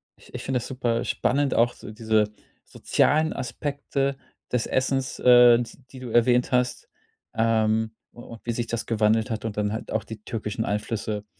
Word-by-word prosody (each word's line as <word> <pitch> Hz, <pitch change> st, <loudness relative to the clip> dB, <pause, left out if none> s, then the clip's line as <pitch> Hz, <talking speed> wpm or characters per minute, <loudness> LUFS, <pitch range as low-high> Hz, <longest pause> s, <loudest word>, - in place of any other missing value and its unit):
ich -, -, -20 dB
ich -, -, -6 dB
finde 135 Hz, -1 st, -1 dB
das -, -, -7 dB
super 120 Hz, -3 st, -1 dB
spannend 140 Hz, +2 st, 0 dB
auch 120 Hz, +1 st, +3 dB
so -, -, -10 dB
diese 110 Hz, -1 st, +1 dB, 0.3 s
sozialen 155 Hz, +2 st, +1 dB
Aspekte 140 Hz, +1 st, -2 dB, 0.4 s
des 125 Hz, -2 st, 0 dB
Essens, 130 Hz, 0 st, -1 dB
äh, 120 Hz, -1 st, +7 dB
s 115 Hz, -, -8 dB
die 130 Hz, -, -10 dB
du 125 Hz, -, -7 dB
erwähnt 120 Hz, +2 st, +3 dB
hast, 125 Hz, 0 st, 0 dB, 0.5 s
ähm, 110 Hz, 0 st, +1 dB, 0.2 s
u 120 Hz, -, -12 dB
und 115 Hz, -1 st, -11 dB
wie 120 Hz, -, -1 dB
sich 120 Hz, 0 st, -3 dB
das 115 Hz, 0 st, -3 dB
gewandelt 110 Hz, +1 st, +1 dB
hat. 110 Hz, -, -3 dB
Und 110 Hz, -2 st, -4 dB
dann 105 Hz, 0 st, 0 dB
halt 110 Hz, -, -6 dB
auch 110 Hz, -, -1 dB
die 110 Hz, -2 st, -9 dB
türkischen 110 Hz, -1 st, -4 dB
Einflüsse, 105 Hz, 0 st, -3 dB
115 Hz, 180 wpm, -25 LUFS, 110-125 Hz, 0.5 s, äh